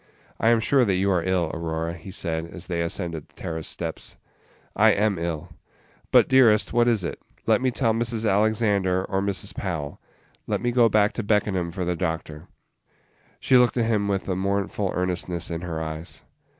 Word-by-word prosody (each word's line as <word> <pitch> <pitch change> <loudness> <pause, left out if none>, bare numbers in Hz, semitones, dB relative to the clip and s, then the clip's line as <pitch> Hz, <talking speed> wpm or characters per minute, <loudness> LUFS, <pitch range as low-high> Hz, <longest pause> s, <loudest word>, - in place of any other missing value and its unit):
"I 115 - +3
am 115 -1 +4
sure 130 +3 +3
that 100 -5 +1
you 95 +2 +1
are 90 -2 +2
ill, 90 -3 0
Aurora," 80 0 -3
he 85 +3 -10
said, 85 -3 -2
as 90 +1 -9
they 85 -2 -2
ascended 85 -3 -3
the - - -28
terrace 80 -1 -4
steps. - - -5 0.6
"I - - +5
am 100 -3 +1
ill." 85 -2 -4 0.6
"But, - - +5
dearest, 120 -6 +4
what 120 0 +3
is 115 -5 +2
it? 85 - -5 0.2
Let - - +3
me 130 - +2
tell 120 -2 +1
Mrs. 115 -1 -1
Alexander, 100 -3 +2
or 95 -1 -1
Mrs. 100 0 -1
Powell. 80 -7 -4 0.5
Let - - 0
me 120 - -1
go 120 -1 +4
back 105 -1 +3
to 115 - -4
Beckenham 100 -4 0
for 90 +1 -4
the 90 0 -1
doctor." 80 -2 -4 0.9
She 130 - +4
looked 125 0 +3
at 115 - +2
him 105 -3 +1
with 100 -1 -1
a 95 - -1
mournful 100 +1 -1
earnestness 90 -1 -2
in 85 0 -3
her 85 -3 -4
eyes. 80 +1 -6
95 Hz, 190 wpm, -24 LUFS, 85-110 Hz, 0.9 s, I